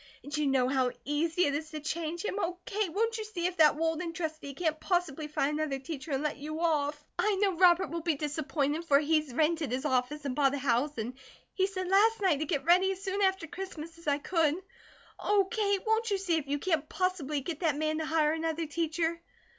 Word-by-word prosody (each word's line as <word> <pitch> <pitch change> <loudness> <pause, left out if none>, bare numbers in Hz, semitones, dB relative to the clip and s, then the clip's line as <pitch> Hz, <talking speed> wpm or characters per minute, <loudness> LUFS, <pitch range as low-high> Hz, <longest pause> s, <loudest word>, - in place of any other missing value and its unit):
And 290 +2 -5
you 300 -1 +1
know 265 -2 +3
how 260 -1 +2 0.2
easy 320 +4 +1
it 285 - +1
is 310 +2 -3
to 310 -1 -5
change 325 +3 -3
him. 415 - -2
Oh, 360 -2 -2
Kate, 420 -6 -1
won't 455 +4 0
you - - -2
see 395 -5 -4
if 360 0 -1
that 305 -2 +6
Walden 325 +2 -1
trustee 310 -5 -5
can't 315 -1 -1
possibly 330 -5 -1
find 300 0 0
another 300 -3 -1
teacher, 275 +1 -7
and 270 +2 0
let 300 -1 -1
you 305 +2 -5
off? 300 -2 0
I 425 -1 +3
know 390 0 +2
Robert 355 +1 +5
will 335 0 -3
be 325 -1 +1
disappointed, 295 +1 -1
for 280 -4 +5
he's 305 -1 +1
rented 310 +1 +1
his 260 +3 -2
office 285 +2 0
and 260 -2 -2
bought 280 -1 +3
a - - -2
house 275 +2 0
and 230 +3 -3 0.4
he 380 -1 +2
said 370 -2 -4
last 420 +4 +4
night 375 -7 +3
to 310 - -2
get 285 -1 -2
ready 365 +3 +5
as 385 0 -6
soon 390 +1 -1
after 380 -3 +2
Christmas 330 -2 -7
as 335 - -14
I 285 -1 +3
could. 315 0 +1 0.6
Oh, 405 -2 +2
Kate, 405 -4 +1
won't 445 +1 +1
you 400 - +1
see 370 -4 0
if 295 -3 -3
you 285 +1 0
can't 310 -1 -1
possibly 330 -6 -1
get 320 +2 -5
that 315 -5 +1
man 310 +1 0
to 315 - -2
hire 310 -1 +3
another 325 0 -2
teacher?" 330 +2 -1
320 Hz, 225 wpm, -30 LUFS, 295-360 Hz, 0.6 s, that